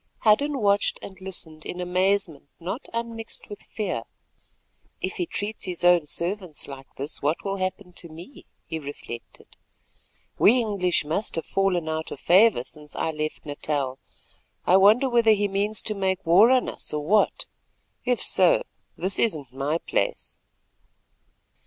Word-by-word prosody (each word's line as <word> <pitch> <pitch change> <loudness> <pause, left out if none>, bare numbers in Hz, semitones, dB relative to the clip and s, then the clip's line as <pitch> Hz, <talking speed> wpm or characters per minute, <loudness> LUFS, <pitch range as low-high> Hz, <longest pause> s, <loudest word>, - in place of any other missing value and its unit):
Hadden 280 +7 +3
watched 205 -3 +2
and 190 -1 -10
listened 165 -4 -8
in 180 - -6
amazement 180 -3 0
not 190 - -5
unmixed 230 -1 -5
with 205 - -8
fear. 190 - -3 1.0
"If 185 - -4
he 175 - -1
treats 210 +2 -3
his 180 -2 -1
own 175 -3 +5
servants 180 0 -1
like 135 -1 -9
this, 140 +3 -2
what 150 +3 0
will 195 0 -1
happen 185 0 -4
to 170 - -6
me?" 170 - -12 0.2
he 160 - -4
reflected. 140 -5 -10 0.8
"We 235 +5 +6
English 195 -9 0
must 165 +8 -1
have 165 - -2
fallen 185 -4 0
out 160 0 -3
of - - -7
favour 190 - +5
since 150 +2 -10
I 160 - -1
left 155 0 -4
Natal. 145 -2 -2 0.7
I 180 - +5
wonder 215 +7 +5
whether 235 -3 +5
he 205 -1 +1
means 200 +2 +1
to 215 - +1
make 190 -1 -1
war 185 +8 +7
on 255 -1 +3
us - - -3
or 150 -1 -3
what? 210 +6 +2 0.6
If 245 -1 0
so, - - +4 0.3
this 190 +1 -2
isn't 150 - 0
my 140 +4 -1
place." - - -2
185 Hz, 150 wpm, -25 LUFS, 160-210 Hz, 1.0 s, war